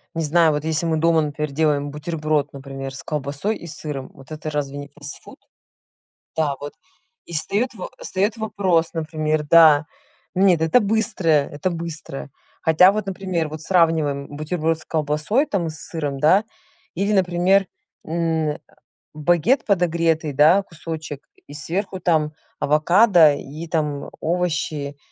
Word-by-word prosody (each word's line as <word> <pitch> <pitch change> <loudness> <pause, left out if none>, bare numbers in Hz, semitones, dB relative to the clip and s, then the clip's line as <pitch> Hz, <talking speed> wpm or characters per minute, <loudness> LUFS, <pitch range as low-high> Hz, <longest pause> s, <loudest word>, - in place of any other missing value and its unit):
Не 165 - -1
знаю, 160 +1 +4
вот 150 0 -2
если 160 +1 -1
мы 160 -1 +1
дома, 165 0 +3
например, 150 0 -3
делаем 145 -1 +1
бутерброд, 155 -1 -2
например, 135 -1 -7
с 135 - -8
колбасой 150 +8 -3
и - - -11
сыром, 150 -4 -6
вот 135 - -16
это 155 0 -5
разве 145 -1 -3
не 145 0 -7
фастфуд? 145 0 -9 1.0
Да, 150 -3 +1
вот. 145 0 -7 0.5
И - - -12
встаёт 205 +10 -1
во 185 - -7
встаёт 205 +4 -1
вопрос, 190 -7 0
например, 155 -1 -1
да 160 -2 +7 0.5
нет, 185 -3 +4
это 160 +9 +4
быстрое 195 -9 +1
это 145 +5 -2
быстрое. 165 -5 -6 0.3
Хотя 170 +4 +6
вот, 215 0 -3
например, 185 -4 -2
вот 155 +1 -7
сравниваем 160 -5 +1
бутерброд 155 +2 -2
с 155 - -11
колбасой 155 - 0
там 190 - -1
и - - -3
с 155 -1 -9
сыром, 145 -5 -4
да, 185 +8 +4 0.5
или 200 +4 0
например, 185 +1 +3 0.4
м, 160 -2 -1 0.6
багет 175 - +2
подогретый, 170 -5 +1
да, 155 +8 +5
кусочек 160 -5 -7 0.2
и 145 - -11
сверху 185 +6 -4
там 155 -3 +1 0.3
авокадо 165 +2 +5
и 150 +4 -8
там 150 -3 -2
овощи. 160 -4 -2
160 Hz, 145 wpm, -22 LUFS, 150-175 Hz, 1.0 s, да